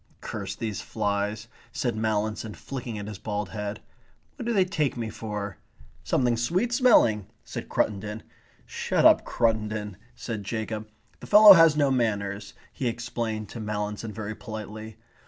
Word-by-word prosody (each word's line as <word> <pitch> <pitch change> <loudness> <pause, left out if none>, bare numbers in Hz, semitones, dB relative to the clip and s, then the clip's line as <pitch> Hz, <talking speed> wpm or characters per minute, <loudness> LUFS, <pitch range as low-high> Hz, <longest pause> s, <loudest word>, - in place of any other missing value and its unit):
"Curse - - -5
these 110 -4 -4
flies," 105 +1 -2 0.2
said 120 -3 -1
Mallinson, 110 0 -1
flicking 125 -5 -6
at 105 - -5
his 105 -3 -7
bald 105 -2 -3
head. 105 0 -5 0.5
"What 240 - -7
do - - +1
they 195 -5 +4
take 155 -8 -1
me 115 -2 -3
for?" 105 -5 -5 0.4
"Something 120 -2 +1
sweet 185 - 0
smelling," 120 - +4 0.2
said - - -7
Cruttendon. 105 +2 -1 0.4
"Shut - - 0
up, - - +7
Cruttendon," 105 -3 -1 0.2
said 110 -3 -5
Jacob. 110 0 -4 0.3
"The - - -10
fellow 210 0 +10
has 165 -4 +6
no 140 -2 +3
manners," 105 -5 -1 0.2
he 130 - -2
explained 115 -2 -3
to 115 - -7
Mallinson 105 0 -3
very 110 +1 -5
politely. 110 0 -8
110 Hz, 145 wpm, -26 LUFS, 105-120 Hz, 0.5 s, fellow